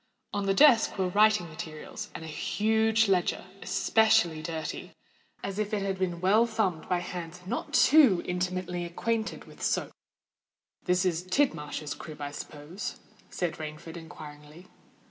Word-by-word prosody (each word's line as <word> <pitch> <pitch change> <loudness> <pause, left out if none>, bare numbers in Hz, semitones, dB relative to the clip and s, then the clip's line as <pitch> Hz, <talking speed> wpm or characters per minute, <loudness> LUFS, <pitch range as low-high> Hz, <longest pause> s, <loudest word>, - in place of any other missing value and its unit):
On 200 -1 -1
the 195 - +2
desk 245 -5 +6
were 185 -1 +1
writing 210 -1 +4
materials, 155 -1 -7
and - - -6
a - - -7
huge 220 +6 +2
ledger, 185 -3 +1 0.2
especially 215 -8 +3
dirty, 160 -1 -5 0.5
as 195 +1 -4
if 215 0 -1
it 200 - -1
had 195 -1 -2
been 175 -2 -1
well 210 +5 +4
thumbed 200 -8 -1
by 180 - +2
hands 175 0 -6
not 230 +6 -3
too 265 - +6
intimately 180 0 -2
acquainted 220 +6 -2
with - - -15
soap. - - 0 0.9
"This 180 +1 +2
is 175 -2 +1
Tidmarsh's 155 - -1
crib, 155 -2 -10
I 145 -1 -4
suppose?" 150 +6 -7 0.3
said 175 -3 -3
Rainford 155 +2 -7
inquiringly. 155 0 -11
180 Hz, 145 wpm, -29 LUFS, 160-210 Hz, 0.9 s, desk